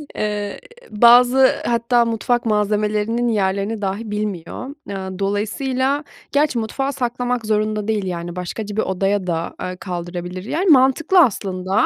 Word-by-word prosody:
Eee, 210 -1 -3 0.3
bazı, 245 +4 +6
hatta, 235 0 +2
mutfak 235 +1 0
malzemelerinin 210 +2 0
yerlerini 200 0 0
dahi 205 +2 -3
bilmiyor. 210 +1 -4 0.2
Aaa, 190 -1 -5
dolayısıyla, 255 +8 -1 0.3
gerçi, 285 -4 +2
mutfağa 270 +5 -2
saklamak 245 -2 -2
zorunda 215 0 0
değil, 215 -3 0
yani, 175 -1 -4
başkaca 205 +3 -5
bir 220 - +1
odaya 195 0 -1
da, 165 -1 -2
eee, 185 0 -4
kaldırabilir, 175 0 -5
yani, 350 - -1
mantıklı, 290 +6 +5
aslında, 195 - +2
215 Hz, 125 wpm, -20 LUFS, 195-245 Hz, 0.3 s, bazı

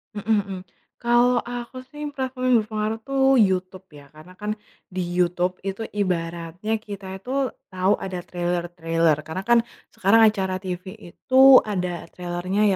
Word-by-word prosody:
Mhm 215 +2 +1
mhm. 195 -2 -6 0.4
Kalau 240 +1 +3
aku 245 +1 -7
sih, 295 +2 -8
platform 260 -2 -3
yang 255 -1 +5
berpengaruh 215 +1 -3
tuh 270 +2 -1 0.2
YouTube, 185 -1 0
ya. 145 -2 -14
Karena 170 +4 -15
kan, 210 +1 -3 0.4
di 185 - -2
YouTube 180 +1 0
itu 195 +2 -3
ibaratnya 175 +1 -2
kita 200 -3 -8
itu 260 +6 -1 0.2
tahu 185 +2 +2
ada 185 -2 -5
trailer-trailer. 170 -2 0
Karena 160 +4 -4
kan, 235 0 +7 0.3
sekarang 200 +4 +4
acara 190 -3 -2
TV 185 0 -5 0.2
itu 265 +7 +7
ada 180 -4 -3
trailernya, 180 +3 -2
190 Hz, 140 wpm, -23 LUFS, 180-225 Hz, 0.4 s, kan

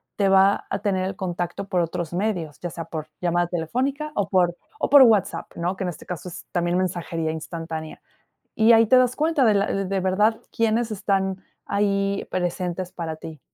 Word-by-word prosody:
te 200 -2 +2
va 195 +1 +4
a 195 - -2
tener 190 -2 0
el 190 0 -3
contacto 180 +1 -4
por 180 -2 +1
otros 170 0 -3
medios, 175 -6 -2
ya 175 - -4
sea 165 -1 -6
por 155 -2 -6
llamada 175 0 +1
telefónica, 260 - -2
o, 205 - 0
por 175 -2 +2 0.2
o, - - 0
por 285 0 +9
WhatsApp, 220 -5 +2
¿no? 175 +3 -2
Que 190 - -4
en 180 - -1
este 165 - -9
caso 180 0 -6
es - - -10
también 175 0 0
mensajería 170 -3 -2
instantánea, 160 0 -6 0.5
y 225 +1 +5
ahí 225 0 +6
te 255 - +5
das 250 -1 +3
cuenta 310 -3 +2
de 220 - +5
l 200 -1 0
de 195 0 -1
verdad 210 +4 +2
quiénes 230 0 +1
están 195 -2 -1 0.2
ahí 200 -1 0
presentes 180 0 -2
para 165 -3 -5
ti. 155 -2 -9
185 Hz, 190 wpm, -24 LUFS, 175-205 Hz, 0.5 s, por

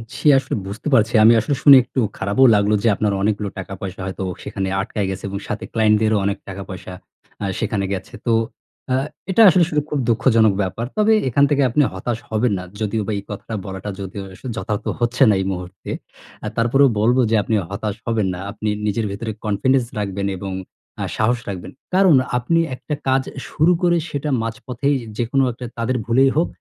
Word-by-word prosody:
জ্বী, - - -1
আসলে 135 - -1
বুঝতে 105 +9 -6
পারছি। 115 -1 +3
আমি 115 - +8
আসলে 125 +6 -1
শুনে 140 -2 +10
একটু 130 - -4 0.2
খারাপও 100 +7 +3
লাগলো। 105 +1 +2
যে, 115 - +3
আপনার 105 0 0
অনেকগুলো 105 0 0
টাকা 95 +1 -7
পয়সা 95 0 -6
হয়তো 95 0 -4 0.2
সেখানে 95 -1 -3
আটকায় 105 -1 -3
গেছে 95 - -5
এবং 100 - -4
সাথে 105 - -4
ক্লায়েন্ট 110 -1 +4
দেরও 110 -1 +3
অনেক 100 0 0
টাকা 95 +1 -6
পয়সা 90 -1 -8 0.5
আ - - 0
সেখানে 105 -3 -1
গেছে। 95 - -6
তো 120 - +2 0.6
আ - - +3 0.4
এটা 225 - +4
আসলে 180 0 +4
স - - -13 0.2
খুব 150 - -1
দুঃখজনক 115 -2 +4
ব্যাপার। 100 +5 -3
তবে 215 +1 +4 0.2
এখান 140 +4 +3
থেকে 145 -1 +2
আপনি 150 +6 +2
হতাশ 110 +5 -3
হবেন 110 +1 +1
না। 90 - -5 0.2
যদিও 110 +1 0
বা - - -1
এই 100 - -10
কথাটা 105 +2 -6
বলাটা 95 +1 -6
যদিও 95 +1 -6 0.3
যথার্থ 105 -2 -3
হচ্ছে 120 +1 +2
না - - +5
এই - - -2
মুহূর্তে। 90 0 -7 0.6
আ - - -1
তারপরেও 130 +4 +4
বলব 120 +4 +3
যে, 115 - +2
আপনি 110 - 0 0.2
হতাশ 100 0 -3
হবেন 115 -4 0
না। 90 - -6
আপনি 110 +1 -3 0.2
নিজের 105 +1 0
ভেতরে 110 +3 -4
কনফিডেন্স 120 +5 +2
রাখবেন 100 -1 -2
এবং 95 +1 -5 0.5
আ - - -1
সাহস 120 +3 +2
রাখবেন। 95 -3 -6 0.2
কারণ 185 -4 +6 0.2
আপনি 165 +8 +1 0.2
একটা 150 - -6
কাজ 130 0 +3 0.3
শুরু 155 +4 +3
করে, 175 -1 +3
সেটা 145 +1 -3
মাঝপথেই 125 +5 -2 0.2
যেকোনো 130 +3 +1
একটা 120 +1 -8
তাদের 120 +2 0
ভুলেই 130 +4 +4
হোক 170 - +3
110 Hz, 190 wpm, -20 LUFS, 100-130 Hz, 0.6 s, শুনে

